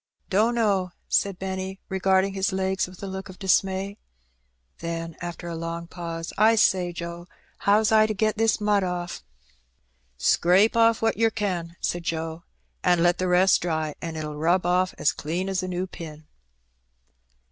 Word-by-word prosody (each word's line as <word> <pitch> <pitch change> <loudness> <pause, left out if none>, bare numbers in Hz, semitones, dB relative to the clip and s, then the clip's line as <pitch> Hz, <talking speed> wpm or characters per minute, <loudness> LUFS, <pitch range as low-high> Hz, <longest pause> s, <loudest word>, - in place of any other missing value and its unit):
"Dunno,'^ 205 -3 +2
said 200 -2 +1
Benny, 190 0 -4
regarding 190 0 +2
his 195 0 0
legs 190 0 0
with 185 +1 -13
a - - -2
look 190 0 -6
of 185 - -11
dismay. 195 +1 0 0.8
Then, 165 -1 -4
after 175 0 -6
a 170 - -4
long 165 +1 -4
pause, 165 -1 -6
"1 220 +1 +5
say, 185 -4 +3
Joe, 170 0 -7 0.3
how's 210 +2 +3
I 215 0 +5
to 215 - -2
get 215 +1 +1
this 225 0 +2
mud 210 -1 +2
off?" 175 - -4 0.9
"Scrape 185 - +4
off 230 -1 +4
what 225 - +2
yer 225 0 +4
can," 180 -6 -3
said 175 - -1
Joe, 165 -1 -3 0.4
"and 175 -2 +3
let 175 0 +3
the 185 - 0
rest 180 +1 +4
dry, 160 -3 -1
and 165 -1 -5
it'll 150 -1 -5
rub 170 +4 +2
off 180 +1 +1
as - - +2
clean 170 +5 -3
as 190 -1 -1
a 185 - -4
new 180 0 -2
pin." 155 -4 -10
185 Hz, 165 wpm, -25 LUFS, 170-195 Hz, 0.9 s, 1